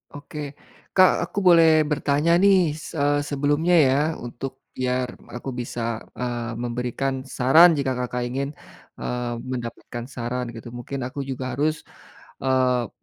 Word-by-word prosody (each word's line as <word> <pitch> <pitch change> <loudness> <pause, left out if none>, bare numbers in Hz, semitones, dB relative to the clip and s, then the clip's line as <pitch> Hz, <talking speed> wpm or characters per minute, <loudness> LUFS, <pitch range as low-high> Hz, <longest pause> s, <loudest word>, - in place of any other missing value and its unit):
Oke. 145 0 -7 0.4
Kak, 185 -1 +7 0.2
aku - - -2
boleh 165 -2 +7 0.2
bertanya 150 +2 +1
nih, 190 -5 +5
se 155 +2 -9 0.3
sebelumnya 145 +5 +2
ya, 135 -5 +5 0.2
untuk 130 +3 -7
biar 125 0 0 0.3
aku 120 +2 -5
bisa 120 0 -4 0.3
eee, 120 -1 -3
memberikan 125 +3 -2 0.2
saran 155 +8 +7
jika 135 -1 0
Kakak 125 0 -2
ingin, 135 +3 -2 0.5
eee, 125 -1 -3 0.2
mendapatkan 120 -1 -5
saran 125 -1 -4
gitu 115 - -9
mungkin 125 +3 -6
aku 130 +3 -6
juga 130 -1 -4
harus 155 +2 0 0.6
eee, 130 -3 +2
130 Hz, 130 wpm, -24 LUFS, 125-145 Hz, 0.6 s, Kak